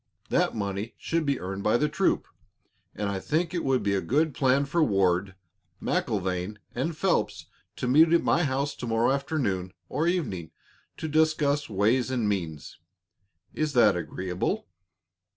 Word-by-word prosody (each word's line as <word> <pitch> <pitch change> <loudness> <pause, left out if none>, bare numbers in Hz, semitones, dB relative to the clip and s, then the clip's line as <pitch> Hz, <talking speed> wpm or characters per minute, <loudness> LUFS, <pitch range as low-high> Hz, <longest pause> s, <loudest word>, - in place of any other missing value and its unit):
That - - +1
money 100 +1 -3
should 165 -2 -1
be 140 -2 +1
earned 95 +2 -5
by 105 +3 +3
the 150 - +2
troop, 160 +6 +1 0.7
and 105 - -2
I 100 -1 -2
think 165 - -1
it 175 - -1
would 130 -2 +1
be 100 - +1
a 95 - +1
good 145 - +1
plan 135 +1 +2
for 160 +4 +2
Ward, 95 -4 +1 0.4
MacIlvaine, 95 0 -1 0.2
and 155 +6 -2
Phelps 190 +2 0 0.3
to 125 - -3
meet 155 +6 +6
at 170 - +4
my 175 - +3
house 140 0 0
to 125 - -5
morrow 115 +2 +2
afternoon 125 - -1 0.2
or 160 +3 0
evening 100 - -1 0.5
to 160 - -4
discuss 150 -2 +2
ways 110 +5 +2
and 120 -5 0
means. 85 -8 -3 0.7
Is 155 -1 -1
that 115 -6 +5
agreeable?" 90 +1 -3
125 Hz, 155 wpm, -27 LUFS, 100-150 Hz, 0.7 s, meet